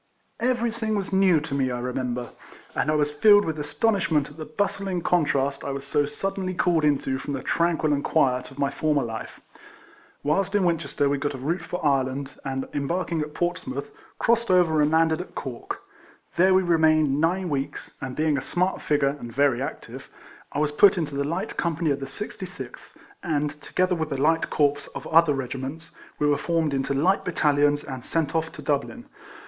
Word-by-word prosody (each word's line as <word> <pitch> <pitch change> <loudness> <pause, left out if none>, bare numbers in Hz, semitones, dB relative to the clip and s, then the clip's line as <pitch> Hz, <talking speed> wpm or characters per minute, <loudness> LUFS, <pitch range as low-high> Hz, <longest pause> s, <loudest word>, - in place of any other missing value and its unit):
Everything 235 -3 0
was 195 -1 -3
new 190 -4 +5
to 145 - -6
me, 135 -2 +1
I 125 - -2
remember, 125 0 -2
RIFLEMAN 120 - -10
HARRIS. - - -20
9 - - +2
and 155 - +1
I - - +1
was 150 -1 +1
filled 205 +7 +6
with 155 -1 -3
astonishment 155 0 +1
at 145 - -15
the 155 - -7
basthng 190 +1 -2
contrast 140 -5 +1
I - - -4
was 135 0 -4
so 145 +1 +1
suddenly 185 +4 -3
called 175 -3 +2
into 135 -3 +1
from 145 - -5
the 130 - -5
tranquil 165 -3 +1
and 145 - -1
quiet 125 -5 +1
of 135 - -15
my 140 0 0
former 150 -1 +1
life. 115 -1 -6 0.8
Whilst 195 +7 +1
in 205 - +3
Winchester, 165 -5 0
we 140 0 0
got 145 0 -2
a - - -6
route 160 +7 -2
for 175 0 -5
Ireland, 135 0 0
and 135 -1 -3
embarking 165 +3 -1
at 150 0 -5
Portsmouth, 140 -6 -3 0.3
crossed 235 0 +2
over 170 -4 +4
and 150 - +3
landed 160 +1 +3
at 180 - -11
Cork. 125 -3 -6 0.5
There 185 +2 +5
we 190 - +4
remained 155 -4 +3
nine 180 +3 +1
weeks; 140 -1 -3
and 130 -1 -5
being 155 -2 +1
a - - -6
smart 180 +7 -1
figure 145 -1 +1
and 120 - -7
very 135 -1 +2
active, 140 - -7 0.4
I - - -5
was 150 0 +1
put 185 +6 +6
into 155 -4 -2
the 140 0 0
light 170 +8 -3
company 165 -2 0
of 140 - -1
the 135 - -5
66th, - - -8 0.3
and, 150 -3 0
together 185 0 0
with 160 -3 -2
the 135 - -3
light 160 +3 +2
corps 145 -1 +1
of - - -6
other 165 -2 +4
regiments, 135 +5 -5 0.3
we 150 - 0
were 145 -1 +3
formed 165 -2 0
into 135 0 -1
light 185 +8 +2
battalions, 145 -3 +2
and 130 -3 -7
sent 160 -4 -1
off 160 0 -1
to - - -9
Dublin. 150 - -2
150 Hz, 195 wpm, -25 LUFS, 140-175 Hz, 0.8 s, filled